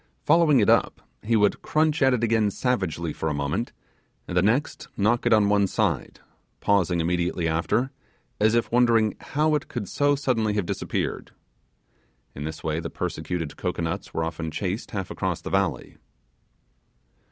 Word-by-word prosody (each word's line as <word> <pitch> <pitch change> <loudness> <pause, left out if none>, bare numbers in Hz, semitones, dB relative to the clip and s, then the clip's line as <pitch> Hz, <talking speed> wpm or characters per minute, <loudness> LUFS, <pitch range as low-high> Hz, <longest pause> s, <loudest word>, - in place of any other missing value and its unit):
Following 155 -3 +5
it 105 - +3
up, - - +2 0.2
he 115 +2 +1
would 105 -2 +2
crunch 155 0 +1
at 135 -1 +5
it 125 -2 0
again 110 -2 +2
savagely 95 - -1
for 80 - -2
a 75 - -2
moment, 70 0 -2 0.6
and 90 - -5
then 90 +1 +3
next 125 +8 0
knock 115 +4 +2
it - - +2
on 105 -2 +5
one 100 -1 +3
side, - - -1 0.4
pausing 95 -4 +2
immediately 85 0 0
after, 85 +11 0 0.5
as 110 +2 +3
if 120 - 0
wondering 115 -3 +3
how 155 +2 0
it 150 - -1
could 115 -5 -5
so 145 +6 +2
suddenly 115 -7 0
have 105 -4 0
disappeared. - - -3 1.0
In 70 - -6
this 80 0 -6
way 80 0 -1
the - - -5
persecuted 80 -4 -4
cocoanuts 80 -1 -3
were 80 - -2
often 80 0 -4
chased 95 +6 -3
half 95 -4 -4
across - - -2
the - - -7
valley. - - -1
105 Hz, 165 wpm, -25 LUFS, 85-120 Hz, 1.0 s, Following